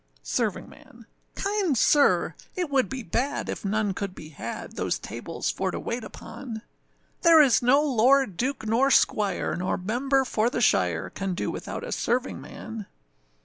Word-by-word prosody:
SERVINGMAN. 230 Hz, -, -4 dB, 0.3 s
Kind 395 Hz, -, 0 dB
sir! 290 Hz, +5 st, +4 dB, 0.2 s
it 355 Hz, -6 st, -2 dB
would 265 Hz, -2 st, +2 dB
be 265 Hz, -2 st, -5 dB
bad 250 Hz, +10 st, -2 dB
if -, -, -4 dB
none 205 Hz, 0 st, 0 dB
could 190 Hz, 0 st, -5 dB
be 155 Hz, -, -10 dB
had 155 Hz, -, -7 dB
Those -, -, -1 dB
tables -, -, -4 dB
for -, -, -2 dB
to -, -, -4 dB
wait 235 Hz, 0 st, -4 dB
upon; 225 Hz, 0 st, -8 dB, 0.6 s
There 335 Hz, -1 st, +7 dB
is 270 Hz, -7 st, +5 dB
no 265 Hz, +4 st, +4 dB
lord, 265 Hz, -, +3 dB
duke, 255 Hz, +4 st, -2 dB
nor 235 Hz, +5 st, +3 dB
squire, 210 Hz, -6 st, +2 dB
nor 180 Hz, +1 st, -1 dB
member 265 Hz, +8 st, +1 dB
for 230 Hz, -1 st, +1 dB
the 245 Hz, -, -2 dB
shire, 90 Hz, -, +2 dB
Can 195 Hz, -2 st, -3 dB
do -, -, -2 dB
without -, -, -6 dB
a -, -, -6 dB
servingman. 230 Hz, -3 st, -3 dB
240 Hz, 155 wpm, -26 LUFS, 210-275 Hz, 0.6 s, There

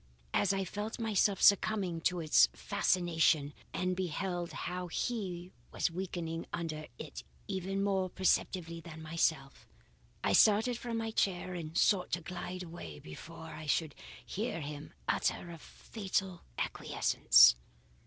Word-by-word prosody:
As 195 Hz, -, +3 dB
I 195 Hz, -1 st, 0 dB
felt 210 Hz, +4 st, -4 dB
myself 210 Hz, -3 st, +2 dB
succumbing 195 Hz, -4 st, +3 dB
to 180 Hz, -1 st, -4 dB
its 150 Hz, -, +6 dB
fascination 160 Hz, -5 st, +2 dB, 0.2 s
and 185 Hz, 0 st, -1 dB
beheld 180 Hz, -1 st, -2 dB
how 180 Hz, +4 st, -4 dB
he 185 Hz, -3 st, -3 dB, 0.2 s
was -, -, 0 dB
weakening 170 Hz, -2 st, -4 dB
under 155 Hz, -2 st, -4 dB
it 150 Hz, -2 st, -8 dB, 0.2 s
even 195 Hz, 0 st, -2 dB
more 190 Hz, -2 st, +1 dB
perceptibly 175 Hz, -2 st, 0 dB
than 160 Hz, -1 st, -10 dB
myself, 155 Hz, -3 st, -1 dB, 0.6 s
I -, -, +2 dB
started 220 Hz, +3 st, +5 dB
from 235 Hz, -2 st, -3 dB
my 225 Hz, 0 st, -2 dB
chair, 185 Hz, -3 st, 0 dB
and 165 Hz, -2 st, -5 dB
sought 190 Hz, -4 st, +3 dB
to 175 Hz, -, 0 dB
glide 180 Hz, +2 st, -6 dB
away 165 Hz, -, -8 dB
before 160 Hz, -, -10 dB
I 155 Hz, -, -8 dB
should 155 Hz, 0 st, +1 dB, 0.3 s
hear 215 Hz, -3 st, -3 dB
him 145 Hz, 0 st, -7 dB, 0.2 s
utter 175 Hz, -, 0 dB
a 165 Hz, -, -9 dB
fatal 190 Hz, -1 st, -4 dB, 0.2 s
acquiescence. -, -, +5 dB
175 Hz, 135 wpm, -33 LUFS, 160-195 Hz, 0.6 s, its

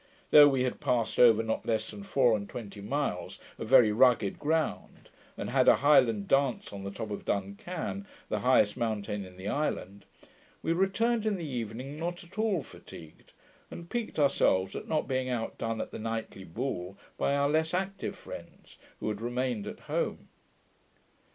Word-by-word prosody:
Though 145 Hz, -1 st, +10 dB
we 135 Hz, -3 st, +2 dB
had 130 Hz, -, -2 dB
passed 125 Hz, -5 st, 0 dB
over 115 Hz, -2 st, +7 dB
not 110 Hz, 0 st, -2 dB
less 110 Hz, -1 st, 0 dB
than 105 Hz, -1 st, -9 dB
four 120 Hz, +2 st, +3 dB
and 100 Hz, -1 st, -5 dB
twenty 105 Hz, -4 st, -8 dB
miles 140 Hz, +8 st, -2 dB, 0.2 s
of -, -, -5 dB
very 110 Hz, -3 st, +7 dB
rugged 115 Hz, -3 st, +3 dB
ground, 160 Hz, +1 st, -2 dB, 0.3 s
and -, -, -4 dB
had -, -, +3 dB
a -, -, +8 dB
Highland 120 Hz, -8 st, +4 dB
dance 135 Hz, -6 st, +1 dB
on 100 Hz, -1 st, -7 dB
the 100 Hz, -, -4 dB
top 105 Hz, +2 st, -6 dB
of 100 Hz, -, -5 dB
Dun 100 Hz, -1 st, -1 dB
Can, 180 Hz, -, -5 dB, 0.2 s
the -, -, -1 dB
highest 125 Hz, -5 st, +3 dB
mountain 105 Hz, -3 st, -2 dB
in 90 Hz, -1 st, -13 dB
the 95 Hz, +2 st, -7 dB
island, 100 Hz, -7 st, -2 dB, 0.6 s
we 165 Hz, -, +1 dB
returned 220 Hz, +5 st, +1 dB
in 210 Hz, -, +1 dB
the 175 Hz, -3 st, -5 dB
evening 125 Hz, +2 st, -5 dB
not 175 Hz, +1 st, -4 dB
at 180 Hz, +4 st, -11 dB
all 205 Hz, -8 st, +1 dB
fatigued, 80 Hz, -9 st, -14 dB, 0.4 s
and 170 Hz, 0 st, -10 dB
piqued 240 Hz, -2 st, -3 dB
ourselves 95 Hz, -10 st, +2 dB
at -, -, -6 dB
not 155 Hz, -1 st, 0 dB
being 130 Hz, -1 st, -1 dB
outdone 115 Hz, -1 st, -3 dB
at -, -, -4 dB
the -, -, -7 dB
nightly 110 Hz, -3 st, -4 dB
ball 95 Hz, -1 st, -4 dB, 0.2 s
by 140 Hz, -, +1 dB
our 140 Hz, 0 st, +2 dB
less 160 Hz, +2 st, +1 dB
active 195 Hz, +2 st, -3 dB
friends, -, -, -11 dB, 0.2 s
who -, -, -3 dB
had 105 Hz, 0 st, -4 dB
remained 120 Hz, -2 st, -2 dB
at -, -, -8 dB
home. -, -, -3 dB
125 Hz, 175 wpm, -29 LUFS, 105-150 Hz, 0.6 s, Though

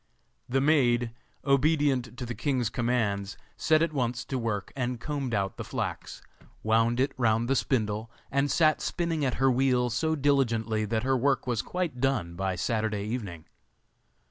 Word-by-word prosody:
The 135 Hz, +2 st, +2 dB
maid, 125 Hz, -5 st, +3 dB, 0.3 s
obedient 140 Hz, -4 st, +2 dB
to 125 Hz, -, -4 dB
the 120 Hz, -, -4 dB
king's 125 Hz, -1 st, -1 dB
commands, 110 Hz, -5 st, -1 dB, 0.2 s
set 155 Hz, 0 st, +3 dB
at 165 Hz, -, -1 dB
once 120 Hz, -4 st, -1 dB
to 130 Hz, -, -3 dB
work 105 Hz, -4 st, -3 dB
and 125 Hz, -2 st, -2 dB
combed 135 Hz, -3 st, -3 dB
out 100 Hz, -1 st, -1 dB
the -, -, -4 dB
flax, -, -, -5 dB, 0.4 s
wound 115 Hz, +2 st, +2 dB
it 135 Hz, +2 st, +2 dB
round 115 Hz, -1 st, +2 dB
the 135 Hz, -, +2 dB
spindle, 110 Hz, -4 st, 0 dB, 0.2 s
and 140 Hz, +1 st, +1 dB
sat 155 Hz, -1 st, +3 dB
spinning 170 Hz, -4 st, -1 dB
at 130 Hz, -2 st, 0 dB
her 135 Hz, +1 st, +3 dB
wheel 125 Hz, -1 st, +2 dB
so 160 Hz, +7 st, 0 dB
diligently 115 Hz, -7 st, +1 dB
that 110 Hz, +1 st, -1 dB
her 135 Hz, +1 st, +2 dB
work 135 Hz, +1 st, +1 dB
was 120 Hz, -3 st, 0 dB
quite 175 Hz, -9 st, -3 dB
done 125 Hz, -11 st, 0 dB
by 95 Hz, +1 st, -1 dB
Saturday 110 Hz, +1 st, -1 dB
evening. 105 Hz, -8 st, -5 dB
125 Hz, 165 wpm, -28 LUFS, 110-140 Hz, 0.4 s, maid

